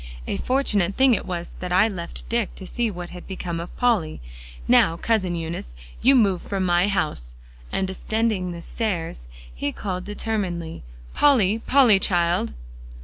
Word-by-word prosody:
"A - - -2
fortunate 210 -8 +1
thing 265 -1 +5
it 215 - -1
was 175 -1 -4
that 180 -1 -5
I 185 +4 +5
left 175 -6 -6
Dick, 230 -3 -1
to 190 - -8
see 235 +4 -1
what 175 -3 -7
had 180 -1 -10
become 180 -3 -4
of 170 - -8
Polly. 220 - +1 0.5
Now, 165 - +4
Cousin 190 -4 0
Eunice, 165 - -5 0.3
you 270 +2 +6
move 200 -7 +3
from 195 -2 -2
my 175 +1 +3
house!" 150 - -2 0.4
and 195 - 0
descending 195 -1 -1
the 170 -1 -7
stairs, 170 - -3 0.3
he 145 - -2
called 185 0 -4
determinedly, 190 -6 -3 0.3
"Polly, 225 -8 +4
Polly, 245 -5 +5
child!" 175 - +1
185 Hz, 155 wpm, -23 LUFS, 170-220 Hz, 0.5 s, you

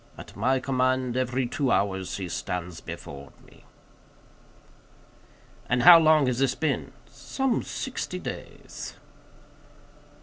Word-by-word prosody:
At - - -11
my 130 +1 +1
command, 130 -1 0
every 130 0 0
two 135 +2 -1
hours 95 -2 0
he 95 -2 -4
stands 90 -1 -5
before 70 0 -9
me." - - -20 2.0
"And 125 -1 +2
how 175 -1 +10
long 155 -2 +5
has 125 -1 -1
this 135 -1 +2
been?" 160 - -2
"Some 265 -3 -2
sixty - - -5
days." - - -8
130 Hz, 110 wpm, -26 LUFS, 100-135 Hz, 2.0 s, how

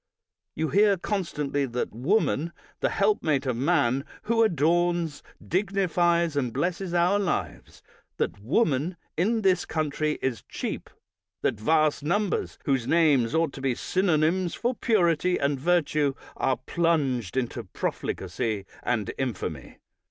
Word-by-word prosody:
You 160 -1 -1
hear 200 0 +4
constantly 150 -8 -2
that 125 -2 -3
woman, 165 - +1 0.3
the - - +1
helpmate 155 - +1
of 130 -2 0
man, 135 -1 +2 0.2
who 230 0 +2
adorns, 170 -3 +2 0.3
dignifies, 175 -4 +1
and 130 -4 0
blesses 175 - -2
our 180 +4 +3
lives, 195 -3 -3 0.3
that 100 - -2
woman 155 - +1 0.2
in 220 +6 +1
this 185 -2 +3
country 155 -1 -1
is 130 -4 -2
cheap; - - -4 0.5
that 115 -5 0
vast 155 +5 +2
numbers 195 +7 -1
whose 135 -5 +1
names 150 -6 +3
ought 160 -3 +1
to 135 - -8
be 135 -2 0
synonyms 175 +1 +1
for 245 +2 0
purity 180 - +2
and 140 -1 0
virtue, 150 -3 +1 0.2
are 130 - +1
plunged 135 - 0
into 120 -2 -2
profligacy 95 +2 -3 0.2
and 110 -5 -1
infamy. 125 -7 -4
155 Hz, 125 wpm, -26 LUFS, 135-180 Hz, 0.5 s, hear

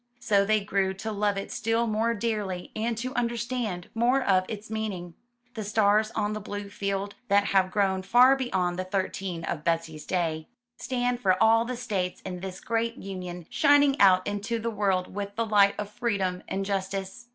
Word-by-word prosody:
So 205 -5 +3
they 215 +1 +2
grew 195 -1 0
to 220 +3 -5
love 205 -1 0
it 195 - -5
still 225 +2 0
more 225 +1 0
dearly 205 -5 -3
and 230 +1 -1
to 255 +3 -4
understand 235 -6 -2
more 240 +4 +3
of 185 -4 +3
its 215 0 -6
meaning. 205 -6 -4 0.4
The 220 - -4
stars 210 +1 +3
on 210 -1 0
the 215 - -3
blue 205 0 -6
field, 200 0 -3
that 200 0 +4
have 190 -1 +4
grown 190 -1 +1
far 245 +7 +6
beyond 185 -9 -1
the - - 0
thirteen 185 -2 -3
of 155 -2 -3
Betsy's 165 -2 -2
day, 160 -3 -1 0.3
stand 245 -1 -1
for 185 -5 +3
all 225 +2 +5
the 250 0 -4
states 200 -7 -2
in 180 -1 -6
this 185 0 -6
great 230 +1 -1
union, 180 -3 -7
shining 285 -1 +5
out 185 -2 +6
into 205 +3 -2
the 230 +1 -3
world 195 -4 0
with 200 0 -5
the 230 - 0
light 205 -2 +4
of 210 - -3
freedom 200 -6 -1
and 195 0 -2
justice. 195 +3 -3
205 Hz, 185 wpm, -27 LUFS, 190-225 Hz, 0.4 s, far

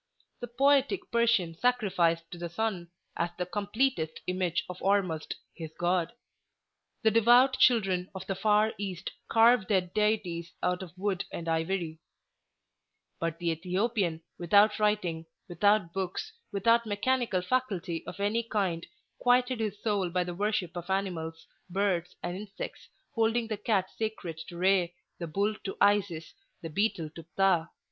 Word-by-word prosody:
The 245 - -5
Poetic 275 +7 +3
Persian 235 -8 +2
sacrificed 175 -7 +1
to 175 - -8
the 170 0 -4
sun, 185 -2 -2 0.3
as 170 - 0
the 180 - -1
completest 205 -3 -1
image 180 -2 0
of 180 0 -7
Ormuzd, 185 -5 0 0.2
his 160 -2 -7
God; 175 -1 +1 0.9
the 220 - +5
devout 240 +4 +5
children 190 -7 +3
of 190 0 -6
the 195 - -2
far 210 +2 +2
East 190 -4 -4 0.2
carved 230 -2 +5
their 195 -3 +3
deities 180 -3 -1
out 180 +1 +1
of 185 -1 -10
wood 195 -1 -1
and 170 - -6
ivory; 165 0 -1 1.2
but 165 -1 -2
the 170 -1 0
Ethiopian, 180 0 -1 0.2
without 205 +5 +4
writing, 185 -6 0 0.2
without 190 0 +2
books, 195 - -3 0.2
without 230 +3 +3
mechanical 210 -2 0
faculty 195 -8 -1
of - - -7
any 205 +3 +1
kind, 195 -7 -2 0.3
quieted 250 0 +3
his 210 -2 -2
soul 205 -5 +1
by 180 +1 0
the 175 0 -5
worship 195 -2 -1
of 175 +1 -6
animals, 170 -4 -2 0.2
birds, 185 -2 0
and 175 +1 -3
insects, 200 +1 -7 0.2
holding 230 +1 +2
the 215 - -1
cat 200 -3 +1
sacred 200 -7 -3
to 175 - -9
Re, 180 -1 +2 0.2
the 170 - -4
bull 200 +6 0
to 195 - -5
Isis, 200 -5 +2 0.3
the 165 - -5
beetle 170 -4 0
to 165 +1 -10
Pthah. 185 -4 +3
195 Hz, 145 wpm, -29 LUFS, 175-215 Hz, 1.2 s, the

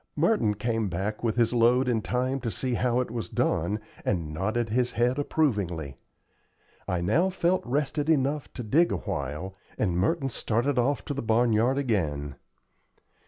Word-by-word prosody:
Merton 150 - +2
came 115 -1 -1
back 100 +6 -3
with 115 -2 +1
his 120 0 +2
load 120 +2 +4
in 115 -3 +1
time 130 +4 -1
to 120 -2 -3
see 125 +3 -2
how 125 +1 +1
it 125 - -4
was 115 -6 -4
done, 90 +7 0 0.2
and 80 -6 -1
nodded 110 +7 -1
his 125 +2 0
head 125 +4 +1
approvingly. 100 - -1 0.9
I 90 -1 -1
now 150 - +2
felt 185 0 +1
rested 145 +3 -1
enough 145 -1 +1
to 125 - -5
dig 155 +11 +3
awhile, 75 +8 -4 0.2
and 90 -5 0
Merton 135 - +1
started 125 +3 0
off 125 -2 0
to - - -3
the 140 - -3
barn 115 +1 +2
yard 120 +5 +2
again. 80 - -1
120 Hz, 165 wpm, -27 LUFS, 105-135 Hz, 0.9 s, load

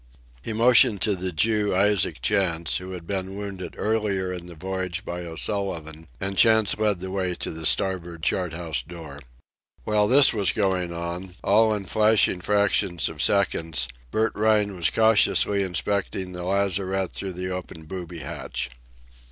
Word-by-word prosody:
He 115 - -5
motioned 115 -1 +5
to 105 -3 +2
the 95 0 -4
Jew, 105 +4 +1
Isaac 100 -1 +1
Chantz, 85 -5 +1
who 95 +1 -7
had 90 -2 -8
been 95 +1 -4
wounded 100 -3 -7
earlier 100 -4 -1
in 90 -1 -8
the 85 - -11
voyage 95 +2 -4
by 90 0 -5
O'Sullivan, 80 -3 -3
and 95 0 -2
Chantz 110 -3 +5
led 105 -4 0
the 95 0 -6
way 95 -2 -2
to - - -5
the 80 -1 +1
starboard 85 -4 +1
chart 90 0 0
house 80 -2 -2
door. 80 -4 -10 0.6
While 105 -1 +2
this 135 +3 +7
was 100 -4 +1
going 95 -4 0
on, 85 +2 -6
all 110 +2 +4
in 100 -2 -5
flashing 105 -2 +3
fractions 100 -3 +1
of 80 -3 -6
seconds, 80 -8 +1 0.2
Bert 110 - 0
Rhine 105 -2 +1
was 85 -5 +1
cautiously 110 0 +3
inspecting 95 0 -2
the 90 -1 -6
lazarette 95 -1 0
through 95 -1 -4
the 90 +1 -5
open 90 -3 -7
booby 85 -1 -7
hatch. 65 -2 -5
95 Hz, 160 wpm, -24 LUFS, 85-105 Hz, 0.6 s, this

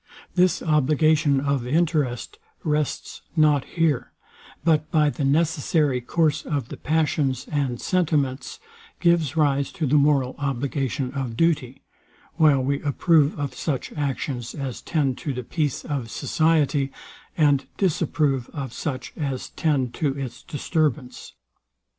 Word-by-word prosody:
This 180 -2 +2
obligation 150 -1 +3
of 140 -3 -1
interest 150 -4 0 0.2
rests 150 -2 -2
nor 155 -3 +4
here; 160 -3 -1 0.5
but 155 -1 +2
by 150 -3 +3
the 145 - -4
necessary 150 -2 +2
course 155 +3 +1
of 140 -5 -3
the - - -7
passions 150 -4 0
and 135 -5 -1
sentiments, 150 - 0 0.4
gives 165 -4 +2
rise 140 -2 +2
to 160 - -2
the 145 +2 +3
moral 140 -3 +3
obligation 135 -1 -2
of 130 -5 -4
duty; 145 -5 0 0.5
while 150 -5 +5
we 140 +1 0
approve 150 +1 +2
of 145 -1 -3
such 140 -5 -3
actions 135 -4 -3
as 135 -4 -5
tend 140 -6 0
to 145 -4 -3
the 125 0 -4
peace 145 +2 -2
of 135 -6 -3
society, 150 +1 +1 0.5
and 145 -4 +3
disapprove 150 -7 0
of 135 -5 -5
such 135 -5 -4
as 135 -4 -3
tend 140 -7 0
to 140 -3 -1
its 135 -1 -6
disturbance. 150 -4 -2
145 Hz, 130 wpm, -24 LUFS, 135-155 Hz, 0.5 s, while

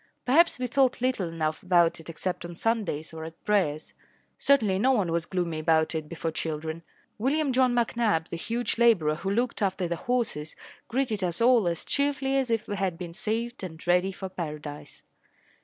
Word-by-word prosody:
Perhaps 325 +7 +4
we 255 - -2
thought 260 +1 +2
little 250 -7 0
enough 155 -1 -2
about 175 -2 +3
it 160 - -9
except 180 +2 -2
on 175 0 -7
Sundays 195 -8 -1
or 160 0 -6
at 165 +1 -10
prayers. 170 -8 0 0.5
Certainly 215 -9 +3
no 265 +5 +4
one 195 -9 +1
was 170 0 -1
gloomy 175 -4 -2
about 160 0 +2
it 155 -2 -4
before 165 -1 -3
children. 160 +1 -4 0.4
William 275 +4 +1
John 255 -1 +3
McNabb, 230 -7 +1
the - - -4
huge 230 +6 -2
labourer 205 -11 +4
who 190 +4 -3
looked 235 +3 0
after 190 -2 0
the 170 0 -2
horses, 230 -10 -2 0.3
greeted 225 -5 0
us 175 -2 -1
all 235 -4 +5
as 170 -1 -2
cheerfully 280 -1 0
as 265 -2 +1
if 225 -2 0
we 205 - -3
had 185 -3 -1
been 175 -1 -7
saved 225 +5 -3
and 160 -3 -8
ready 180 +2 +3
for 190 0 -6
paradise. 150 -5 -7
190 Hz, 185 wpm, -27 LUFS, 165-240 Hz, 0.5 s, all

